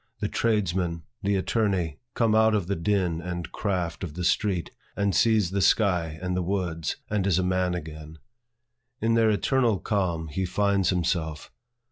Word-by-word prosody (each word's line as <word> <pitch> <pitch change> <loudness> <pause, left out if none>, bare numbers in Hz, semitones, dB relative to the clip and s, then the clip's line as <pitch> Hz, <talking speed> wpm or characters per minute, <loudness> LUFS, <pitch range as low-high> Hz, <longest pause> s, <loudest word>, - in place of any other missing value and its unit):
The - - -1
tradesman, 90 -7 0 0.2
the 100 +1 +1
attorney 95 -6 0 0.2
comes 115 -2 +2
out 110 0 +4
of 100 -5 0
the 100 +2 -1
din 85 -1 0
and 85 -2 -5
craft 90 -4 -2
of 80 -4 -5
the 90 - -4
street, 90 0 0 0.2
and 100 -1 +1
sees 110 -4 +3
the 100 0 0
sky 90 -5 +2
and 90 0 -1
the 90 - 0
woods, 90 -3 -2 0.2
and 100 -2 +1
is 95 - +3
a 95 - +1
man 90 -1 +1
again. 80 -1 -8 0.8
In 115 +1 +1
their 115 -1 +4
eternal 115 +1 +2
calm, 90 -6 -1
he 95 +6 -2
finds 100 0 +1
himself. 85 -4 -1
95 Hz, 165 wpm, -26 LUFS, 85-100 Hz, 0.8 s, out